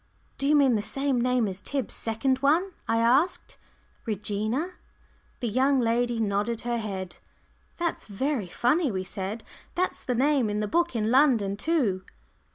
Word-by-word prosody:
"Do 275 - 0
you 300 - +5
mean 275 -4 +5
the 215 - +1
same 270 +2 0
name 250 -2 +2
as 190 0 -5
Tib's 275 +2 -3
second 260 +4 0
one?" 320 +8 +2 0.2
I 225 - +2
asked; 255 +10 +2 0.5
"Regina?" 215 - -1 0.7
The 240 - 0
young 265 +5 +2
lady 240 0 +1
nodded 215 +2 0
her 240 0 -1
head. 190 -4 -5 0.6
"That's 340 -1 -2
very 230 +1 -2
funny," 280 - +1
we 190 -2 -2
said. 195 +4 -5 0.3
"That's 365 +1 -1
the 250 - -1
name 265 -2 +2
in 210 0 -1
the 210 - -1
book 345 +4 +1
in 220 0 0
London 245 -8 +4
too." 225 - 0
240 Hz, 160 wpm, -27 LUFS, 210-275 Hz, 0.7 s, you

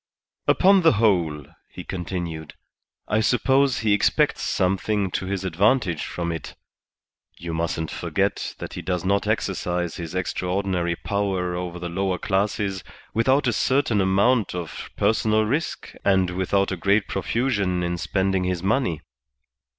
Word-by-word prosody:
"Upon 195 0 +5
the 165 -4 +5
whole," 85 - +1 0.2
he - - -9
continued, 85 -4 -5 0.5
"I 105 - +1
suppose 130 +3 +2
he 110 -2 +3
expects 100 - +2
something 95 +1 0
to 95 - -3
his 95 -1 -2
advantage 95 - +1
from 85 -1 -3
it. 80 - -6 0.8
You 85 -1 -5
mustn't 80 -1 -2
forget - - -1
that - - -7
he - - -5
does 90 -2 -2
not 100 +1 +1
exercise 90 -1 -1
his 85 0 -6
extraordinary 90 -1 -1
power 95 -2 -1
over 90 0 -4
the 90 0 -5
lower 95 +1 -1
classes 100 0 -1 0.3
without 130 +6 +3
a 120 - +2
certain 130 -6 +2
amount 100 +3 +2
of 85 -3 -6
personal 110 0 +2
risk 145 +10 -2
and 95 -2 +3
without 95 +2 0
a 95 - -2
great 100 +3 +2
profusion 100 -4 0
in 85 0 -1
spending 95 +1 0
his 90 -1 -2
money. 100 - 0
95 Hz, 140 wpm, -24 LUFS, 90-105 Hz, 0.8 s, Upon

